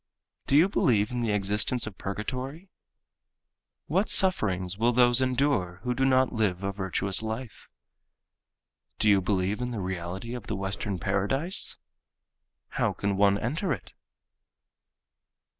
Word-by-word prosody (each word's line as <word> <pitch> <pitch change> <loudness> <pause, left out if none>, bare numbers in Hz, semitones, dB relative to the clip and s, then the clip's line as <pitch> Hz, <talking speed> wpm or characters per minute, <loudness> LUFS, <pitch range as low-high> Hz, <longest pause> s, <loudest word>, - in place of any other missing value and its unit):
Do 140 - +4
you 165 +5 +6
believe 115 - +2
in 125 - -2
the 115 -2 -1
existence 105 +4 +1
of 110 -3 -7
purgatory? 130 - -5 1.2
What 190 +8 0
sufferings 95 - +3
will 115 +4 +2
those 120 +1 +4
endure 130 -9 0
who 125 - 0
do 135 +2 0
not 130 -1 +3
live 100 -5 0
a 100 - -1
virtuous 95 0 -1
life? 110 +1 -6 1.3
Do 110 - +1
you 100 -2 +5
believe 95 +3 -1
in 125 - -2
the 115 -3 -4
reality 95 +4 -5
of 120 -2 -7
the 110 - -2
Western 95 0 -2
Paradise? 105 - 0 0.9
How - - 0
can 100 -1 -2
one 100 0 +4
enter 155 - -2
it? 90 -9 -9
110 Hz, 135 wpm, -27 LUFS, 95-130 Hz, 1.3 s, you